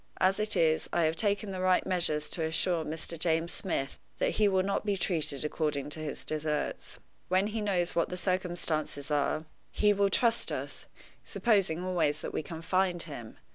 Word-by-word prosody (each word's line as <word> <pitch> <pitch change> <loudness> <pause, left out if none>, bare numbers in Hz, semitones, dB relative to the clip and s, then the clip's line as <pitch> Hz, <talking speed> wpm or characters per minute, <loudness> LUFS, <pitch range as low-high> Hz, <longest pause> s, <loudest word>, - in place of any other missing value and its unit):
As 190 +2 +3
it 215 0 0
is, 160 -1 +2
I 170 - +2
have 160 0 +2
taken 200 +2 0
the 185 -1 -4
right 185 0 +3
measures 165 -5 +1
to 165 - -1
assure 160 +1 +1
Mr. 160 +1 -5
James 165 +1 +1
Smith 135 -7 -3 0.2
that - - +1
he 215 - +3
will 190 -2 +3
not 200 +1 -1
be 205 -2 0
treated 155 -6 -1
according 150 -2 -1
to 155 - -4
his 155 -2 -5
deserts. 155 -1 -3 0.3
When 185 +2 +3
he 215 +1 -2
knows 185 -4 0
what 170 - +1
the 180 - -4
circumstances 175 -6 -1
are, 150 +2 +1 0.2
he 210 0 +3
will 200 0 +2
trust 230 +3 +2
us - - -5 0.4
supposing 195 -7 +1
always 160 -5 0
that - - -5
we - - -1
can 160 +1 -8
find 185 0 +1
him. 120 -8 -9
170 Hz, 185 wpm, -30 LUFS, 155-190 Hz, 0.4 s, As